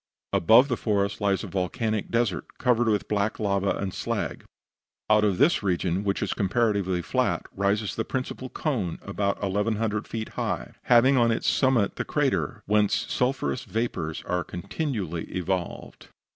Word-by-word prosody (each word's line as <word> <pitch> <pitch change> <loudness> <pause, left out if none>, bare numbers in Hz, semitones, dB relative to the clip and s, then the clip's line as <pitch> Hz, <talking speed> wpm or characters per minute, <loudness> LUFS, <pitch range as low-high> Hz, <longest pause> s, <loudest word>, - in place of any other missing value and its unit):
Above 115 +9 +6
the 125 - 0
forest 100 -2 -1
lies 100 -2 +1
a - - -5
volcanic 105 +3 -2
desert, 115 -6 0
covered 120 -1 +2
with 105 -3 +1
black 105 0 0
lava 100 -2 +1
and 95 -2 -3
slag. - - -3 0.7
Out 105 0 +5
of 100 -4 +2
this 155 +5 +4
region, 90 -1 0
which 100 -1 0
is - - -1
comparatively 100 -3 +1
flat - - 0
rises 100 +1 0
the 110 - -1
principal 130 0 -4
cone, 115 - -2
about 100 0 -1
1,100 105 +2 0
feet 110 -1 -4
in - - -18
height, - - -3
having 130 +3 +5
on 120 -1 +4
its 115 - 0
summit 130 -6 +2
the - - -1
crater, - - -1
whence 105 0 +2
sulphurous 125 - 0
vapors 110 -9 -3
are 90 -1 -1
continually 90 - -4
evolved. 90 0 -4
105 Hz, 155 wpm, -26 LUFS, 95-115 Hz, 0.7 s, Above